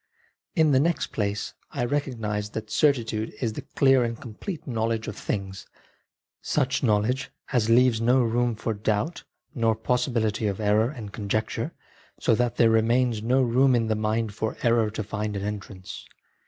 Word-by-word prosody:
In 160 -3 +4
the 130 - +5
next 165 +4 0
place 105 -1 -2 0.2
I 120 - -2
recognised 115 -6 -2
that 110 -1 -5
certitude 115 -7 +1
is 115 -4 -1
the - - -5
clear 135 -2 +3
and 115 -1 -3
complete 145 - -7
knowledge 115 -3 -1
of - - -5
things, 95 -2 -4 0.7
such 135 -3 0
knowledge 115 +3 +1 0.2
as 115 -3 +2
leaves 120 -1 +4
no 125 +2 +4
room 120 0 +1
for 115 +1 -2
doubt 110 +9 -2 0.3
nor 115 -3 +2
possibility 110 -2 0
of 100 0 -2
error 105 +2 +3
and 110 -8 -8
conjecture, 110 +1 -2 0.5
so - - +3
that 120 +1 +1
there 115 -2 +4
remains 115 0 +2
no 130 +4 +2
room 130 +2 +4
in 115 -2 +1
the 110 - +2
mind 110 0 -1
for 110 +1 -3
error 115 -2 +3
to 110 0 -4
find 105 0 -3
an 100 - -4
entrance. 100 -2 -6
115 Hz, 165 wpm, -26 LUFS, 105-125 Hz, 0.7 s, the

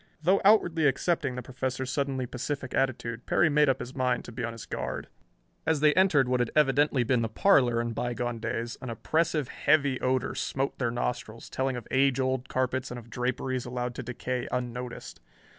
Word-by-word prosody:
Though 185 +4 +4
outwardly 175 -7 +4
accepting 140 -1 0
the 125 - -5
Professor's 130 +1 -3
suddenly 135 -2 -1
pacific 130 +2 -4
attitude, 120 -3 -1
Perry 160 - +3
made 150 -1 +4
up 130 - +1
his 125 - -7
mind 130 -2 0
to - - -8
be 125 +2 -5
on 115 - -2
his 115 -1 -9
guard. - - -4 0.5
As 160 -2 +1
they 150 0 +5
entered 175 -9 +4
what 125 0 +1
had 120 - +1
evidently 145 -2 +3
been 125 0 +2
the 115 - -1
parlor 120 - +4
in 120 0 -2
bygone 120 0 -2
days, 115 +1 -3
an 130 - -6
oppressive, 155 +5 0
heavy 140 -3 +2
odor 130 0 0
smote 135 +1 -2
their 120 -3 +1
nostrils, 115 -1 -4
telling 130 0 -1
of 120 - -8
age 135 0 +3
old 130 -1 -1
carpets 130 0 -1
and 125 - -6
of 115 -1 -11
draperies 130 +1 -2
allowed 125 0 -3
to 130 - -5
decay 125 +1 -3
unnoticed. 125 0 -5
130 Hz, 190 wpm, -28 LUFS, 120-140 Hz, 0.5 s, they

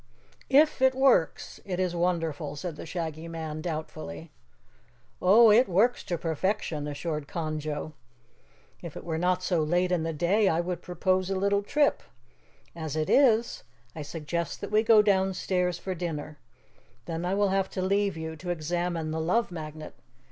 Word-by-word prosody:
"If 285 +1 +4
it 260 0 +4
works, 260 -11 +2
it 185 -3 -4
is 180 -2 0
wonderful," 165 -4 -1
said 160 +2 -5
the 155 - -9
Shaggy 160 -1 -4
Man 160 -2 -5
doubtfully. 155 - -6 0.9
"Oh, 215 +5 +7
it 225 +1 +5
works 220 +8 +2
to 175 - -2
perfection," 160 -2 -2
assured 150 0 -4
Conjo. 155 -2 -4 0.9
"If 170 -4 -8
it - - -8
were 160 -2 -3
not 180 +1 +1
so 175 -3 +1
late 175 +4 +1
in 180 -2 +1
the 165 +1 -2
day, 180 +7 +2
I 165 - +1
would 175 0 -3
propose 185 +1 0
a 195 - 0
little 200 +1 +1
trip. 290 +8 +1 0.7
As 160 -3 -5
it 155 -1 -1
is, 235 -4 +3 0.3
I 160 - -5
suggest 165 +3 -4
that 200 - -6
we 215 +1 +4
go 220 -1 +6
downstairs 190 -3 +1
for 190 +1 -4
dinner. 155 -4 -5 0.7
Then 165 0 -4
I 180 +2 0
will 205 0 +2
have 195 0 0
to 185 - -4
leave 200 -1 +1
you 160 0 -5
to 180 +3 -7
examine 170 0 -2
the 160 0 -2
Love 195 +6 +1
Magnet. 155 -2 -7
175 Hz, 165 wpm, -28 LUFS, 160-195 Hz, 0.9 s, Oh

